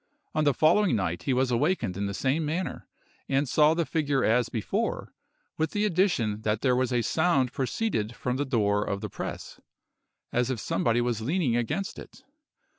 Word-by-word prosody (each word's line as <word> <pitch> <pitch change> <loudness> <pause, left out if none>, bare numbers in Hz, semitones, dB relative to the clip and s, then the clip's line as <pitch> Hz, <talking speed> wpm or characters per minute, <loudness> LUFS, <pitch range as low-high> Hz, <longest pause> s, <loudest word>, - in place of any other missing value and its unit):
On 155 - +1
the 145 - +4
following 175 - +4
night 90 -4 -2
he - - +4
was 130 0 +1
awakened 120 - 0
in 100 +1 -2
the 100 - -4
same 140 +8 0
manner, 165 +5 -3 0.4
and 135 +1 +1
saw 150 +4 +4
the 170 -1 0
figure 145 -2 0
as 120 +1 +2
before, 110 -3 -2 0.5
with 160 0 0
the 210 0 +1
addition 165 - +1
that 110 0 -1
there 125 -2 +3
was 130 0 0
a 120 -1 +1
sound 135 -3 +1
proceeded 130 - -2
from 125 +1 -2
the 145 - 0
door 105 -6 +1
of 100 -1 -3
the - - -4
press, - - -7 0.7
as 125 +1 +1
if 130 -4 -2
somebody 120 +2 +1
was 120 -2 -1
leaning 140 0 0
against 120 - -2
it. 265 - -13
130 Hz, 185 wpm, -27 LUFS, 115-160 Hz, 0.7 s, the